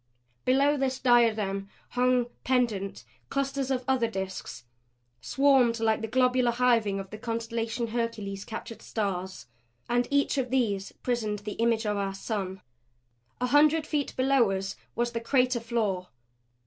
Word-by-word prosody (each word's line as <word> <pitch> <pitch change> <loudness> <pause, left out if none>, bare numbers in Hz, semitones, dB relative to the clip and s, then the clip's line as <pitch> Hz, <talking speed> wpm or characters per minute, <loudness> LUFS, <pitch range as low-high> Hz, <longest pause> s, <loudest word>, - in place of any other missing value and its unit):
Below 280 +3 +3
this 265 -1 0
diadem 215 -6 +2 0.2
hung, 250 0 +2 0.2
pendent, 230 -7 0 0.3
clusters 275 -1 -1
of 255 -1 0
other 260 -3 +2
disks, 190 - -5 0.6
swarmed 265 - +3
like 220 0 +1
the 225 - -2
globular 250 +1 +3
hiving 230 -5 +2
of 195 -1 -8
the 215 - -7
constellation 230 0 -2
Hercules' 220 -4 -3
captured 225 +1 -7
stars. 190 -3 -3 0.4
And 245 +1 +1
each 280 0 +2
of 255 -1 -1
these 215 -7 0
prisoned 225 -4 -1
the 210 - -3
image 230 -1 +2
of 210 -1 0
our 195 -1 -2
sun. 195 -2 -4 0.8
A 250 - +1
hundred 300 +4 +4
feet 295 -2 -2
below 260 -3 +4
us 195 0 -2 0.2
was 240 0 0
the 230 -1 -3
crater 250 0 +2
floor. 215 -6 -1
235 Hz, 140 wpm, -28 LUFS, 210-255 Hz, 0.8 s, hundred